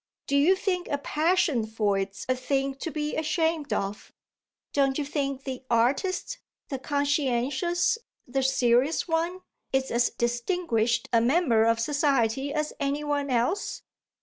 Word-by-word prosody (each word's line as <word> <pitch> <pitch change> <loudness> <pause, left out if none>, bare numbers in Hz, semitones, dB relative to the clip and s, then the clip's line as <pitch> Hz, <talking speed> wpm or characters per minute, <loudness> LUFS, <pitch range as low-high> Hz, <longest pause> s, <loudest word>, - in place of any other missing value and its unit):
Do 280 - -1
you 305 +7 +5
think 370 -2 -2
a 285 - -1
passion 305 -5 +1
for 215 -2 0
it's 195 0 -3
a 255 - +2
thing 270 +1 -1
to 330 - -4
be 300 -1 -3
ashamed 320 -1 0
of? 200 +1 -3 0.6
Don't 275 -2 +2
you 295 - -1
think 275 -2 -2
the 260 -2 -5
artist 280 - +1 0.3
the 270 -3 -3
conscientious, 285 - 0 0.3
the 270 +2 0
serious 260 +3 +2
one 335 +3 -1 0.3
is 265 0 0
as 240 +1 +2
distinguished 240 - 0
a 230 - +5
member 240 -4 +3
of 230 0 +2
society 275 -1 +1
as 305 0 -2
any 285 +1 -1
one 290 -1 -1
else?" 255 - 0
275 Hz, 145 wpm, -27 LUFS, 240-310 Hz, 0.6 s, you